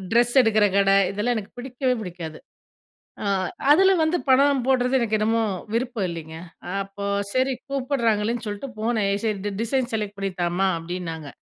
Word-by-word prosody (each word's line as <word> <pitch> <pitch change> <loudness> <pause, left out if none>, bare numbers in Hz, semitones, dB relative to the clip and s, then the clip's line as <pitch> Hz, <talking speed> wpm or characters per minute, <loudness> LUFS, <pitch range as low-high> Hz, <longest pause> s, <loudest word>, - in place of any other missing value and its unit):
Dress 240 +1 +4
எடுக்கிற 215 -3 +3
கடை 195 0 +4 0.2
,இதெல்லாம் 210 +5 0
எனக்கு 210 -2 -5
பிடிக்கவே 255 +1 -1
பிடிக்காது. 170 -5 -7 0.8
ஆ - - -4 0.5
அதுல 380 +5 +6
வந்து 315 +3 +2
பணம் 275 +1 +4
போடுறது 255 0 +3
எனக்கு 220 -2 +1
என்னமோ 225 +2 +2 0.3
விருப்பம் 235 -4 -1
இல்லைங்க. 160 -1 -7 0.5
அப்போ 195 +1 -7 0.3
சரி 260 +1 +2 0.2
கூப்பிடுறாங்களேன்னு 235 -4 0
சொல்லிட்டு 210 +6 -5
போனேன். 220 -3 0 0.2
"சரி, 215 -2 0
டி 205 - -1
டிசைன் 245 +1 -1
செலக்ட் 210 -2 -3
பண்ணி 195 -1 -2
தாம்மா" 175 +3 +1
அப்படின்னாங்க. 165 -2 -6
220 Hz, 145 wpm, -24 LUFS, 195-255 Hz, 0.8 s, அதுல